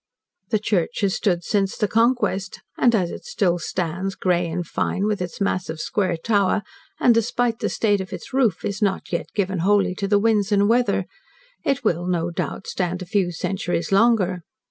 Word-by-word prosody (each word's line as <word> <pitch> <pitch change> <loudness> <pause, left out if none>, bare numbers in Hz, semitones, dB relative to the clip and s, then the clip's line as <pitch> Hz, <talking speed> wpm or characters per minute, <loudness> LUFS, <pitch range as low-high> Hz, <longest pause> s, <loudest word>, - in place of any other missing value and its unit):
The 220 - +2
church 205 0 -1
has 195 -2 +2
stood 175 -4 0
since 195 +1 0
the 210 - +1
Conquest, 210 -3 +1 0.2
and, 235 -2 +3
as 180 -5 0
it - - -8
still 190 - 0
stands, 185 +3 -3
grey 175 -2 +1
and 175 +1 -3
fine, 190 +4 -1
with 210 -3 -1
its 180 -2 -5
mass 185 -3 -1
of 160 0 -5
square 185 -1 0
tower, 205 +2 +1 0.4
and 245 - +5
despite 230 +1 0
the - - -1
state 205 -3 +1
of 190 - -8
its - - -8
roof, 255 -6 +1
is 200 +2 -3
not 195 -2 0
yet 170 - -2
given 190 -2 0
wholly 195 +1 +3
to 195 +2 -3
the 205 +1 +4
winds 210 -1 +2
and 205 0 +4
weather, 225 -5 +2 0.6
it 275 0 0
will, 175 +1 0
no 175 -1 0
doubt, 180 - -4
stand 180 0 -2
a - - -9
few 185 0 0
centuries 175 0 -2
longer. 195 -4 +3
195 Hz, 190 wpm, -22 LUFS, 180-215 Hz, 0.6 s, and